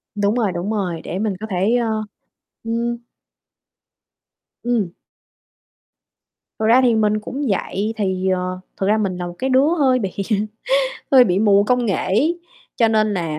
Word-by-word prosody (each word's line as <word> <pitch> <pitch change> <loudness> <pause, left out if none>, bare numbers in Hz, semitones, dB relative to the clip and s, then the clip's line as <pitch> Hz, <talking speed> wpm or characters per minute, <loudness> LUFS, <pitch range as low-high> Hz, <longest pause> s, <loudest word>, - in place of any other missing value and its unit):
Đúng 205 +2 +1
rồi, 220 -6 +1
đúng 180 +4 -3
rồi, 180 -6 -2
để 185 - -4
mình 215 -1 0
có 220 - -6
thể, 195 +5 +1
ơ 220 -3 0 0.6
ừm. 235 +1 -2 1.7
Ừm. 235 -7 0 1.7
Thật 220 - 0
ra 240 +4 +6
thì 240 -3 +3
mình 215 -1 +2
cũng 270 +7 -5
vậy, 205 +2 -1
thì, 190 -2 -1
ờ 185 0 -1 0.2
thực 195 - -1
ra 215 - +3
mình 195 -4 -1
là 175 - -4
một 175 - -7
cái 265 - -1
đứa 265 +3 +4
hơi 260 -2 +3
bị 195 -5 -2 1.0
hơi 255 -2 +8
bị 185 -3 +1
mù 200 -1 +4
công 245 +2 +1
nghệ 195 - +1
ấy, 305 - 0 0.4
cho 230 - +3
nên 215 -1 +2
nà 165 -4 -2
215 Hz, 165 wpm, -20 LUFS, 190-235 Hz, 1.7 s, hơi